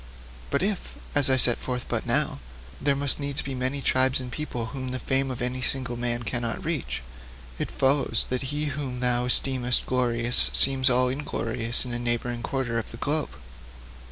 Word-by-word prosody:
But - - -1
if, 200 -1 -4 0.2
as 145 -3 +2
I 130 - +3
set 120 -1 +4
forth 125 -1 -5
but - - -4
now, - - +1 0.4
there 140 0 +1
must 140 0 +1
needs 140 +1 -4
be 135 - -6
many 130 +2 -3
tribes 130 0 +1
and 125 -1 -8
peoples 120 -6 -5
whom 130 -1 -6
the 130 0 -4
fame 135 +1 -1
of 125 -1 -5
any 125 +1 -4
single 130 -1 -2
man 120 0 -3
cannot 120 - -4
reach, 155 - -3 0.6
it - - -3
follows 135 -4 +2
that 130 +1 -3
he 145 +1 -3
whom 130 -3 -6
thou 125 0 +1
esteemest 125 -1 +4
glorious 120 -1 +4
seems 135 -1 +5
all 125 0 +2
inglorious 120 -4 +3
in 125 - -6
a 120 - -4
neighbouring 120 0 -3
quarter 120 -3 -3
of 110 - -8
the 115 - -10
globe. 145 +5 -2
130 Hz, 185 wpm, -25 LUFS, 120-135 Hz, 0.6 s, seems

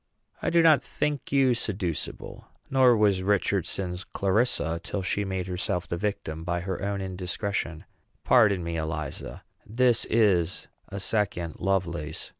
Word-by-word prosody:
"I - - 0
do 170 0 +4
not 155 -3 +6
think 150 -2 -3
you 135 -2 +4
seducible; 95 -8 -3 0.3
nor 130 -3 +5
was 100 -3 +3
Richardson's 95 -2 0
Clarissa 95 -5 0
till 100 - -3
she 100 +2 0
made 95 -1 -2
herself 90 0 -2
the - - -2
victim 85 -5 -3
by 85 0 -1
her 95 0 -4
own 100 0 -2
indiscretion. 95 -2 -3 0.4
Pardon 105 -7 +4
me, 85 0 -3
Eliza 75 -2 -5 0.2
this 120 +1 +2
is 95 -7 +2 0.2
a 100 - -5
second 95 -6 -1
Lovelace. 85 -5 -1
95 Hz, 135 wpm, -27 LUFS, 85-105 Hz, 0.4 s, not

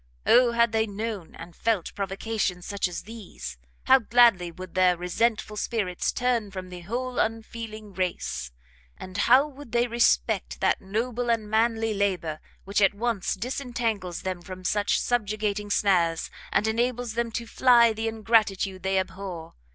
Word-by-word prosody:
Oh 240 -1 +5
had 235 -1 +3
they 220 0 +1
known 205 -3 -5
and 165 0 -11
felt 220 -6 -1
provocations 195 -2 -2
such 200 -2 -1
as 175 - -6
these, 200 - -9 0.2
how 265 0 +6
gladly 230 -7 +4
would 185 +1 -10
their 185 -1 +4
resentful 210 +4 -1
spirits 205 -6 -1
turn 245 -4 0
from 185 -1 -7
the 180 -1 -8
whole 245 +7 -3
unfeeling 220 -2 -4
race, 170 - -3 0.5
and 185 0 -9
how 255 +7 +5
would 285 -5 -13
they 240 0 +3
respect 235 0 +1
that - - +2
noble 235 +5 -2
and 225 -2 +1
manly 225 0 +1
labour, 185 -6 -1 0.2
which 200 +2 0
at 195 0 +4
once 225 -3 -1
disentangles 230 -5 -3
them 185 -2 -3
from 185 0 -9
such 205 +2 +1
subjugating 210 -3 -1
snares, 175 -5 +2 0.2
and 210 - +2
enables 240 +1 -1
them 235 0 -1
to 235 - -3
fly 235 -1 +5
the 225 +1 -3
ingratitude 215 -4 +1
they 190 +1 0
abhor! 185 -3 -4
215 Hz, 150 wpm, -26 LUFS, 185-235 Hz, 0.5 s, how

